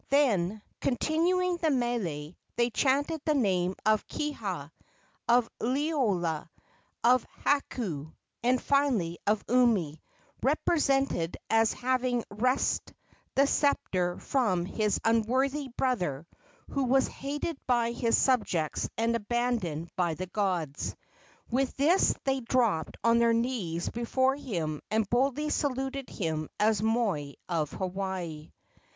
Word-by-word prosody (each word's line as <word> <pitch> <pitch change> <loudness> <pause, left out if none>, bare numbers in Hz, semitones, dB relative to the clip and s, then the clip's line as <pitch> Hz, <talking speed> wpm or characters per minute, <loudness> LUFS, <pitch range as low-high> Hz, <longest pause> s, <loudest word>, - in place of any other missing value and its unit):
Then, 215 -8 +2 0.2
continuing 345 +7 +1
the 330 -2 +1
mele, 215 - -1 0.2
they 240 0 +2
chanted 285 +6 +1
the 305 -2 +2
name 190 -7 +1
of 215 0 +2
Kiha, 200 - -4 0.6
of 240 0 +4
Liloa, 230 - 0 0.5
of 250 0 +5 0.2
Hakau, 195 - -1 0.3
and 250 +2 +3
finally 245 -14 +1
of 210 0 +2
Umi, 215 -11 +2 0.4
represented 275 - +1
as 225 0 +4
having 255 -1 0
wrested 255 +6 0 0.4
the 275 - +5
sceptre 185 -12 +1
from 200 -10 0
his 210 +2 0
unworthy 260 +6 +1
brother, 185 - -1 0.5
who 275 -2 0
was 265 +2 +3
hated 290 +2 -4
by 240 -2 +2
his 235 -1 +2
subjects 200 - +1
and 230 +1 +1
abandoned 220 -8 -2
by 175 -3 0
the 185 - -4
gods. 180 -7 -2 0.6
With 260 +2 0
this 320 +8 +4
they 270 0 +1
dropped 230 -9 0
on 230 0 +4
their 235 0 +4
knees 230 -9 -1
before 260 +3 +1
him 170 - -3
and 220 -1 +1
boldly 275 +6 +1
saluted 270 -1 -2
him 160 -5 -3
as 210 -1 +3
moi 210 -11 0
of 160 -4 -1
Hawaii. 185 -5 -4
235 Hz, 115 wpm, -29 LUFS, 180-265 Hz, 0.6 s, of